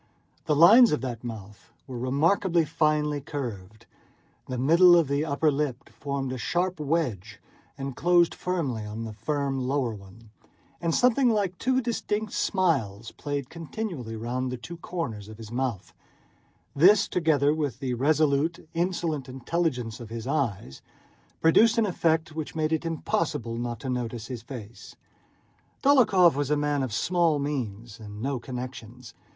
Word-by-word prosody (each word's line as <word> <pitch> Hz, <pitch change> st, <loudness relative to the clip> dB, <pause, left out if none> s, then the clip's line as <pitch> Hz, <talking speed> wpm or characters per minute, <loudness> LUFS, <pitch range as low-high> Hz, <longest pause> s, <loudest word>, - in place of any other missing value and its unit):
The 150 Hz, -, +2 dB
lines 220 Hz, -, +8 dB
of 150 Hz, -, 0 dB
that 120 Hz, -3 st, -5 dB
mouth 105 Hz, -4 st, -9 dB
were 130 Hz, -3 st, -8 dB
remarkably 165 Hz, +7 st, +2 dB
finely 150 Hz, -2 st, +1 dB
curved. 110 Hz, -8 st, -6 dB, 0.6 s
The 130 Hz, -, -4 dB
middle 170 Hz, +7 st, +6 dB
of 165 Hz, -4 st, +3 dB
the 140 Hz, +2 st, 0 dB
upper 155 Hz, 0 st, +1 dB
lip 140 Hz, -3 st, -3 dB
formed 140 Hz, -2 st, -4 dB
a 130 Hz, -, -5 dB
sharp 175 Hz, +5 st, -1 dB
wedge 130 Hz, -, -2 dB, 0.4 s
and 135 Hz, -2 st, -5 dB
closed 175 Hz, 0 st, +3 dB
firmly 150 Hz, -12 st, -2 dB
on 105 Hz, +2 st, -6 dB
the 110 Hz, -1 st, -6 dB
firm 135 Hz, +5 st, -2 dB
lower 130 Hz, -4 st, 0 dB
one, 105 Hz, +2 st, -14 dB, 0.5 s
and 170 Hz, -1 st, 0 dB
something 250 Hz, +1 st, +4 dB
like 200 Hz, -5 st, 0 dB
two 260 Hz, 0 st, +1 dB
distinct 220 Hz, -3 st, -2 dB
smiles 130 Hz, -, 0 dB
played 145 Hz, -3 st, -5 dB
continually 165 Hz, -, -5 dB
round 125 Hz, +3 st, -3 dB
the 125 Hz, -, -4 dB
two 120 Hz, +9 st, -9 dB
corners 125 Hz, -, -5 dB
of 110 Hz, -, -10 dB
the 115 Hz, 0 st, -10 dB
mouth; 120 Hz, -6 st, -3 dB, 0.8 s
this, 195 Hz, +8 st, +6 dB
together 150 Hz, -4 st, +2 dB
with 145 Hz, -6 st, -2 dB
the 130 Hz, -2 st, -3 dB
resolute, 155 Hz, +4 st, +1 dB
insolent 165 Hz, -5 st, -2 dB
intelligence 130 Hz, -4 st, -2 dB
of 115 Hz, -3 st, -9 dB
his 115 Hz, -1 st, -6 dB
eyes, 115 Hz, -, -2 dB, 0.6 s
produced 225 Hz, +9 st, +5 dB
an 225 Hz, -, +4 dB
effect 165 Hz, -4 st, 0 dB
which 160 Hz, -1 st, -5 dB
made 155 Hz, 0 st, 0 dB
it 160 Hz, +1 st, -1 dB
impossible 155 Hz, -7 st, -2 dB
not 120 Hz, -1 st, -4 dB
to -, -, -6 dB
notice 120 Hz, -3 st, -3 dB
his 125 Hz, -2 st, -6 dB
face. 115 Hz, -2 st, -10 dB, 0.9 s
Dólokhov 220 Hz, -, +5 dB
was 145 Hz, 0 st, -2 dB
a 150 Hz, -, +2 dB
man 145 Hz, -1 st, 0 dB
of 130 Hz, -3 st, -2 dB
small 170 Hz, +5 st, +1 dB
means 120 Hz, -6 st, -4 dB
and 105 Hz, -1 st, -9 dB
no 135 Hz, +2 st, -2 dB
connections. 125 Hz, -1 st, -8 dB
140 Hz, 150 wpm, -26 LUFS, 120-165 Hz, 0.9 s, lines